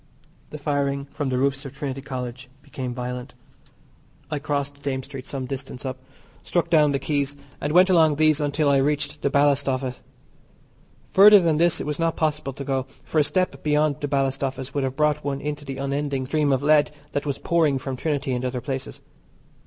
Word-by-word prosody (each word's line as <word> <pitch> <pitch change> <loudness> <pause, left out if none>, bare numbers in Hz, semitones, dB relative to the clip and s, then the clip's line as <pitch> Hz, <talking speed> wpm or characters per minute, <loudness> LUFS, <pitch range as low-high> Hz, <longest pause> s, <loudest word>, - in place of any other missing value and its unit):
The 150 - -7
firing 140 -1 -1
from 145 0 -4
the 130 - 0
roofs 135 +1 0
of 135 -1 -9
Trinity 135 -1 -4
College 125 -2 -6
became 135 -3 -5
violent. 125 0 -5 1.0
I 150 - -1
crossed 140 -1 -3
Dame 135 -2 -2
Street 130 0 -9
some 135 -2 -4
distance 130 0 -5
up, 130 0 -4 0.4
struck 175 - -1
down 150 -3 +5
the 140 - +1
Quays, 140 0 -1 0.3
and 145 - -1
went 180 +3 +6
along 160 -5 +4
these 155 0 +3
until 145 +1 +1
I 140 -1 +4
reached 145 +1 0
the 140 - +1
Ballast 140 -1 +3
Office. 130 -1 -2 1.1
Further 205 +2 +9
than 165 -4 +2
this 170 0 +3
it - - -4
was 150 +1 -2
not 165 -1 +1
possible 150 -3 -1
to 140 - -6
go, 135 -1 -1 0.2
for 155 - 0
a - - +5
step 185 +5 -1
beyond 150 -1 +1
the 145 - -1
Ballast 135 -1 0
Office 135 0 -3
would 140 - 0
have 130 0 -2
brought 150 0 +1
one 140 -1 -2
into 150 0 -4
the 135 -1 -5
unending 140 0 -2
stream 150 +1 +1
of 135 0 +1
lead 150 0 +4 0.2
that 145 +1 -2
was 140 - -1
pouring 160 -5 +2
from 130 0 -4
Trinity 145 0 -2
and 125 0 -2
other 125 0 -2
places. 130 0 -5
140 Hz, 200 wpm, -24 LUFS, 135-150 Hz, 1.1 s, Further